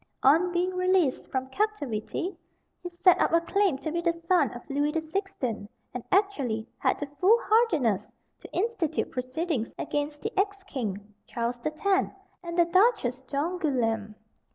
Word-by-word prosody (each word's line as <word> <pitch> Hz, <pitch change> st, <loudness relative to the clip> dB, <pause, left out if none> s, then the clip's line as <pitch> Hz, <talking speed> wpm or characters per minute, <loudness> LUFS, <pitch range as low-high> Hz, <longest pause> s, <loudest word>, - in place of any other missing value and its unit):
On 325 Hz, +7 st, +5 dB
being 355 Hz, +1 st, +1 dB
released 365 Hz, -6 st, +2 dB
from 260 Hz, 0 st, -3 dB
captivity 360 Hz, -, -2 dB, 0.5 s
he 355 Hz, -, -5 dB
set 350 Hz, +1 st, +4 dB
up -, -, +3 dB
a 335 Hz, -, +6 dB
claim 375 Hz, -2 st, +1 dB
to 310 Hz, +3 st, -4 dB
be 340 Hz, +1 st, -1 dB
the 340 Hz, 0 st, +2 dB
son 335 Hz, -4 st, +2 dB
of 240 Hz, -, -10 dB
Louis 290 Hz, +1 st, 0 dB
the 325 Hz, -, 0 dB
Sixteenth, 315 Hz, -, -3 dB, 0.2 s
and 250 Hz, -, -5 dB
actually 280 Hz, -, +1 dB
had -, -, +1 dB
the 290 Hz, -, -2 dB
foolhardiness 405 Hz, -, +3 dB, 0.3 s
to -, -, -12 dB
institute 370 Hz, -6 st, -1 dB
proceedings 255 Hz, 0 st, -2 dB
against 295 Hz, 0 st, -3 dB
the 435 Hz, -, -3 dB
ex 400 Hz, -1 st, 0 dB
king, 210 Hz, -, -5 dB
Charles 240 Hz, +1 st, -2 dB
the 275 Hz, -, -1 dB
Tenth, 380 Hz, +5 st, 0 dB, 0.3 s
and 340 Hz, 0 st, -5 dB
the 345 Hz, -, +6 dB
Duchess 355 Hz, -, +2 dB
d'Angoulême. 265 Hz, -, -1 dB
320 Hz, 155 wpm, -27 LUFS, 255-370 Hz, 0.5 s, a